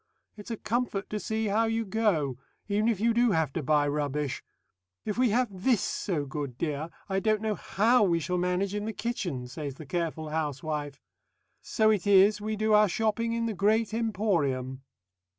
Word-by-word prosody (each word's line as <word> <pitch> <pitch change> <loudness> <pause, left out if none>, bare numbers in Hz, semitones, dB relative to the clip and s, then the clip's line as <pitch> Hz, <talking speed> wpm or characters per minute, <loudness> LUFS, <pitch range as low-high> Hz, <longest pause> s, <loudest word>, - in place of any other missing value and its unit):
It's 210 +1 -11
a 230 - -3
comfort 225 -3 -2
to 210 - -2
see 220 +1 -2
how 215 +2 +2
you 225 0 -1
go, 185 - 0 0.3
even 210 +2 +1
if 220 -5 0
you 230 +2 +2
do 240 -2 +3
have 160 -5 0
to 165 - -2
buy 145 +1 +2
rubbish. 145 -1 -2 0.6
'If 210 - -2
we 250 0 +3
have 240 +2 +2
this 245 -7 +3
so 160 -7 -2
good, 140 -3 -5
dear, 155 +1 -2 0.2
I 190 -1 0
don't 215 +1 +1
know 215 0 -1
how 225 +5 +2
we 175 -5 +3
shall 180 +3 -1
manage 180 +2 0
in 210 0 -2
the 220 - -3
kitchen,' 195 - -3
says 140 +1 -6
the 155 - -10
careful 160 +1 -3
housewife.... 150 -1 -3 0.6
So 220 -1 +2
it 205 -2 0
is 205 +1 +5
we 215 +1 -2
do 215 +1 +1
our 210 -1 +6
shopping 225 +4 0
in 230 0 -1
the 225 - -1
Great 215 +2 +1
Emporium." 170 - -1
200 Hz, 185 wpm, -28 LUFS, 150-220 Hz, 0.6 s, our